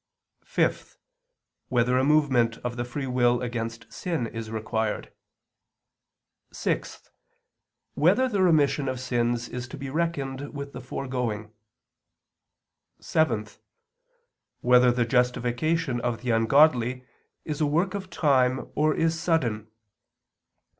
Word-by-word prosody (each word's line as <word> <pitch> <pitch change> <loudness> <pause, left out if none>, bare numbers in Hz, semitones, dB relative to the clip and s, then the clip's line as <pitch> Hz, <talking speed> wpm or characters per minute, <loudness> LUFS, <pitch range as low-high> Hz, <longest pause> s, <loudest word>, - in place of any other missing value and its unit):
(5) - - -1 0.7
Whether 125 0 +2
a - - +2
movement 135 -6 +3
of 120 -1 -3
the 120 - -2
free 130 +3 -5
will 125 -1 +2
against 115 -1 -5
sin 165 -9 -2
is 115 -1 -6
required? 110 0 -3 1.4
(6) - - -3 0.8
Whether 190 - +3
the 205 -6 0
remission 150 -5 +3
of 130 -1 -3
sins 120 -2 -1
is 125 -1 -6
to 125 - -9
be 135 -1 -6
reckoned 145 -4 -3
with 140 0 -6
the 125 - -7
foregoing? 120 -5 -4 1.5
(7) 120 -10 +1 1.2
Whether 125 0 +5
the 120 -1 +1
justification 125 +3 0
of 120 -2 -2
the 125 - 0
ungodly 125 +1 +3 0.4
is 150 -1 -4
a 150 - +3
work 170 +6 +1
of 195 -2 -5
time 130 -6 +1
or 155 +1 +2
is 165 0 +1
sudden? 120 -11 0
125 Hz, 115 wpm, -26 LUFS, 120-150 Hz, 1.5 s, Whether